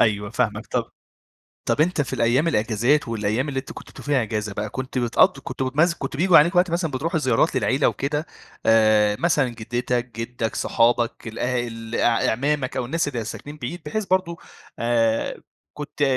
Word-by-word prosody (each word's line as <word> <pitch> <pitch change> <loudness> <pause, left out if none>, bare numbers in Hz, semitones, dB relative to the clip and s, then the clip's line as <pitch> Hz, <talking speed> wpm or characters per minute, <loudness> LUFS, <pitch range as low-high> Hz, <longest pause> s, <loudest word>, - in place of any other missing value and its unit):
أيوه 105 -2 +1
فاهمك 110 -2 -1
طب - - -2 0.7
طب - - 0
أنت 165 +1 +2
في 135 - -7
الأيام 125 +8 +2
الإجازات، 120 +2 +1
والأيام 115 +4 -1
اللي 135 -2 -2
أنتم 130 - -11
كنتم - - -11
بتبقوا - - -12
فيها 140 -3 +2
إجازة 105 -2 -3
بقى 105 +1 -3
كنت 130 +1 -4
بتقضي 120 +2 +3
كنت 135 - -5
بتمز 150 +7 +2
كنت 145 - -5
بييجوا 175 +2 +6
عليكم 170 +4 +4
وقت 180 0 +3
مثلًا 170 -1 -1
بتروحوا 155 +5 -1
زيارات 130 -6 +1
للعيلة 135 +3 +2
وكده، 150 +3 -2 0.4
آآ 110 -2 +4
مثلًا 150 -6 +2
جدتك، 120 +1 -3
جدك، 115 -1 -3
صحابك، 120 -1 +1
الأ 120 +2 -1
الأع 115 0 0
أعمامك 140 +2 -1
أو 130 - -1
الناس 160 +5 -1
اللي 120 -5 -4
ساكنين 145 +6 -8
بعيد 150 +6 -5
بحيث 215 +8 -2
برضه 185 -2 0 0.4
آآ 115 -1 0 0.3
كنت 150 0 -6
125 Hz, 170 wpm, -23 LUFS, 115-150 Hz, 0.7 s, بييجوا